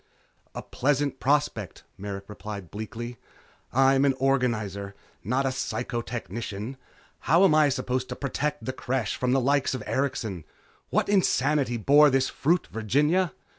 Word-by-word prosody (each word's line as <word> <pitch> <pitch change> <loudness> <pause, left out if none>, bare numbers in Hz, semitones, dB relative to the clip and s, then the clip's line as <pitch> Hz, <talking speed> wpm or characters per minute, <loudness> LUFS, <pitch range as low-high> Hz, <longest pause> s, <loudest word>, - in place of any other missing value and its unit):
"A - - -5
pleasant 140 0 0
prospect," 140 -8 0
Merrick 100 0 -6
replied 105 -3 -8
bleakly. 115 +3 -6 0.5
"I 135 +1 +4
am 135 0 +3
an 135 -2 +3
organizer, 110 -7 0 0.3
not 125 +7 0
a - - +2
psychotechnician. 120 -2 -4 0.5
How 170 +5 +6
am 190 - +5
I 155 -1 +5
supposed 130 -1 -2
to 125 - -4
protect 145 +2 -3
the 130 - -2
Creche 130 -3 -2
from 125 0 0
the 135 - +4
likes 135 +1 +1
of - - -5
Erikson? 115 - -2 0.5
What - - +1
insanity 145 -9 +2
bore 145 +6 +6
this 135 -1 +2
fruit, 170 +5 +1
Virginia? 150 - +1
130 Hz, 140 wpm, -26 LUFS, 115-140 Hz, 0.5 s, How